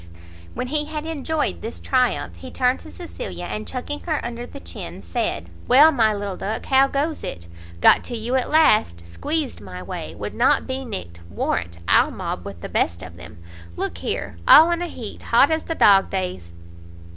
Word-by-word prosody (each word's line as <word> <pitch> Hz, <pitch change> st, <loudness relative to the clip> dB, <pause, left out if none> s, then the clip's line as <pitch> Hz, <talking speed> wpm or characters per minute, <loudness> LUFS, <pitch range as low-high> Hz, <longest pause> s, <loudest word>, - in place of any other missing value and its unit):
When -, -, -2 dB
he 300 Hz, +1 st, 0 dB
had 305 Hz, 0 st, -5 dB
enjoyed 320 Hz, -1 st, -2 dB
this 225 Hz, -, -6 dB
triumph, 255 Hz, -2 st, 0 dB
he 260 Hz, -, -9 dB
turned 250 Hz, 0 st, +1 dB
to -, -, -12 dB
Cecilia, 360 Hz, +9 st, -7 dB
and 215 Hz, -, -5 dB
chucking 265 Hz, +3 st, -4 dB
her 315 Hz, -4 st, -2 dB
under 240 Hz, 0 st, -5 dB
the 280 Hz, -, -10 dB
chin, -, -, -8 dB
said -, -, -2 dB, 0.2 s
"Well, 290 Hz, +6 st, +7 dB
my 225 Hz, -6 st, +3 dB
little 205 Hz, -2 st, -3 dB
duck, 215 Hz, +2 st, -4 dB
how 270 Hz, 0 st, +4 dB
goes 295 Hz, +3 st, -2 dB
it? 85 Hz, -1 st, -6 dB, 0.4 s
got -, -, +6 dB
to 240 Hz, -, -4 dB
you 230 Hz, +3 st, -3 dB
at 260 Hz, -1 st, +1 dB
last; 215 Hz, -, +3 dB
squeezed 275 Hz, -, -3 dB
my 90 Hz, -2 st, -8 dB
way; -, -, -6 dB
would -, -, -6 dB
not -, -, +3 dB
be 265 Hz, 0 st, -4 dB
nicked; 90 Hz, -, -6 dB
warrant 85 Hz, 0 st, -2 dB
I'll -, -, +5 dB
mob -, -, -5 dB
with -, -, -8 dB
the -, -, -5 dB
best 85 Hz, +2 st, -1 dB
of 90 Hz, -2 st, -10 dB
them! 85 Hz, -2 st, -12 dB, 0.4 s
Look -, -, -4 dB
here! 85 Hz, -, -3 dB
all 325 Hz, +3 st, +9 dB
in 340 Hz, 0 st, 0 dB
a 350 Hz, -, -2 dB
heat! 240 Hz, -9 st, -8 dB
hot 270 Hz, +6 st, +4 dB
as 315 Hz, 0 st, 0 dB
the 325 Hz, -, -3 dB
dog 195 Hz, -7 st, +5 dB
days." 180 Hz, -, -4 dB
250 Hz, 190 wpm, -22 LUFS, 190-300 Hz, 0.4 s, all